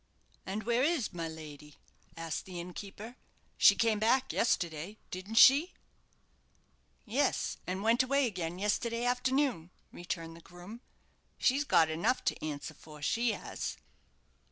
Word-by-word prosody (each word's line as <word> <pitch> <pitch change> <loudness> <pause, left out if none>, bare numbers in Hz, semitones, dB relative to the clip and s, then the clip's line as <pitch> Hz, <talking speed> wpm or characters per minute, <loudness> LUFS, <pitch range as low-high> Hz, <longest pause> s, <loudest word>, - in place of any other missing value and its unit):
"And 205 +3 -3
where 235 +1 +1
is 290 - +1
my 165 -2 -3
lady?" 150 -2 -10 0.4
asked 165 -1 -4
the 180 -2 -7
innkeeper; 200 +6 -8 0.4
"she - - +7
came 225 -2 +2
back 255 +4 +2
yesterday, 175 -2 -1
didn't 185 +4 -6
she?" 285 +10 +7 1.3
"Yes, 260 +5 0
and 185 +2 -3
went 230 +3 +4
away 275 +2 +2
again 180 -6 -3
yesterday 230 +4 -1
afternoon," 250 - 0 0.2
returned 165 -2 -5
the 165 - -13
groom. 175 +8 -12 0.6
"She's 275 +3 +2
got 165 - +4
enough 170 +11 0
to - - -1
answer 155 0 -5
for, 150 0 -13
she 230 +7 +1
has." - - -5
205 Hz, 130 wpm, -31 LUFS, 165-245 Hz, 1.3 s, she